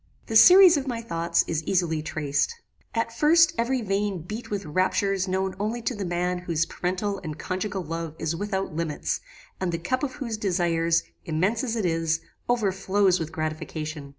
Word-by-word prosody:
"The 225 - -5
series 360 - +9
of 275 -1 -3
my 240 -3 -2
thoughts 170 -6 0
is 160 -1 -2
easily 170 -4 +1
traced. 150 - -1 0.4
At 230 0 -1
first 325 +3 +5
every 240 +1 0
vein 195 -3 -1
beat 215 +7 -7
with 205 -2 -3
raptures 190 +4 +1
known 190 0 -1
only 215 +4 -1
to 250 - -1
the 205 -4 -4
man 180 +1 -1
whose 170 -2 0
parental 190 +3 -2
and 155 -4 -6
conjugal 190 +3 -3
love 165 -1 -5
is 160 - -2
without 195 -1 -3
limits, 150 - -2 0.4
and 185 -2 -1
the 165 - -1
cup 255 +10 -1
of 275 -3 -2
whose 235 -6 -4
desires, 170 -4 +1 0.2
immense 185 +9 0
as 235 -3 -2
it 220 -4 -1
is, 165 -1 +1 0.3
overflows 195 -4 +2
with 165 -1 -4
gratification. 155 -2 -4
185 Hz, 175 wpm, -25 LUFS, 165-215 Hz, 0.4 s, series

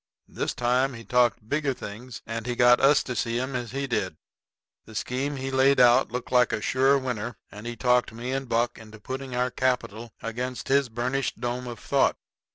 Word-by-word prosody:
This - - -3
time 125 +2 +1
he 115 - -9
talked 120 -3 +2
bigger 145 0 0
things, 115 +3 -8
and 115 +1 -5
he 120 - -1
got 120 0 +6
us 140 +1 +5
to 125 - -5
see 115 +1 -1
'em 130 +1 -3
as 120 -2 -3
he 135 +3 -3
did. 95 -10 -2 0.7
The 110 - -13
scheme 135 +6 -2
he 135 0 -4
laid 135 +1 +4
out 125 0 +5
looked 125 0 -5
like 125 -1 +4
a 110 - -1
sure 130 +5 +3
winner, 120 -4 -4
and 105 +3 -9
he 120 - -4
talked 125 +1 +2
me 120 +3 -5
and 135 -1 -3
Buck 120 +1 0
into 110 -1 -13
putting 130 +3 -6
our 125 +1 0
capital 120 -3 -1
against 125 +3 -4
his 140 -1 +3
burnished 125 +4 -2
dome 120 +1 -3
of 120 -1 -6
thought. - - +1
125 Hz, 200 wpm, -26 LUFS, 115-130 Hz, 0.7 s, got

